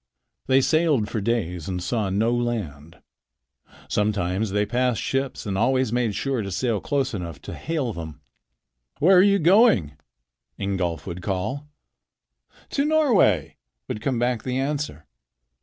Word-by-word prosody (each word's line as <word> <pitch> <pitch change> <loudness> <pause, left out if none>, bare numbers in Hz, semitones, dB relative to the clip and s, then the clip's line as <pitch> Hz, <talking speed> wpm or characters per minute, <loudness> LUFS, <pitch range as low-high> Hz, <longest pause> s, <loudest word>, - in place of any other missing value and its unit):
They 130 0 +4
sailed 150 -8 +2
for 110 - -2
days 95 -7 -2
and 90 -1 -2
saw 100 +3 -1
no 110 +5 +1
land. 100 - -4 0.8
Sometimes 105 -1 0
they 105 +1 +1
passed 125 +1 0
ships 135 -2 -2
and 100 -2 -2
always 130 +3 +1
made 120 -4 0
sure 135 -4 -1
to 100 - -4
sail 105 +2 -1
close 140 -2 -1
enough 85 -7 -5
to - - -7
hail 150 -8 -3
them. 80 -5 -8 0.8
"Where 185 +6 +5
are - - +8
you 200 +1 +4
going?" 170 - +4 0.6
Ingolf 95 -4 -2
would 90 -1 -6
call. 105 +11 -3 1.0
"To 280 - +1
Norway," 230 - +3 0.3
would 105 - -4
come 130 -3 -1
back 120 -1 0
the 130 0 -3
answer. 140 - -3
115 Hz, 140 wpm, -24 LUFS, 95-135 Hz, 1.0 s, are